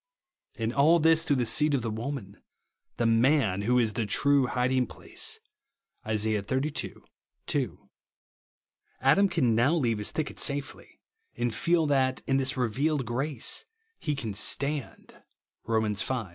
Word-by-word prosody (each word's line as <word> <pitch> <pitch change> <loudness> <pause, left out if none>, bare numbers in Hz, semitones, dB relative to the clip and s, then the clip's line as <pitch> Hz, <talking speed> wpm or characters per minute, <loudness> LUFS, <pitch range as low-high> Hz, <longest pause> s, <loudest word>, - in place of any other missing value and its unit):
And 115 0 -2
all 155 +5 +5
this 165 0 +4
through 150 -3 +1
the 125 -2 0
seed 150 +5 +2
of 125 - -2
the 115 - -2
woman 110 -3 -6 0.3
— - - -53
"the 120 - 0
man" 115 -3 +3
who 125 +4 +2
is 115 -3 +2
the 115 -4 -2
true 140 +4 +2
"hiding 125 +1 +1
place," - - -5 0.7
(Isa. 110 0 +1
xxxii. 130 +7 -3 0.5
2). - - -3 1.1
Adam 195 +10 +4
can 135 -10 +2
now 120 +9 +3
leave 120 -9 0
his 105 - -1
thicket 155 -2 -4
safely; 140 -1 -3 0.4
and 120 -1 -1
feel 165 +8 +1
that, 130 -3 +1
in 135 - +1
this 135 +1 0
revealed 135 +4 0
gi 130 +5 -1
ace, 115 - -1 0.3
he 150 -3 -2
can 115 -7 -4
"stand" 140 +6 -1 0.4
(Rom. 110 -2 0
v. 120 +4 -1
130 Hz, 150 wpm, -28 LUFS, 115-145 Hz, 1.1 s, all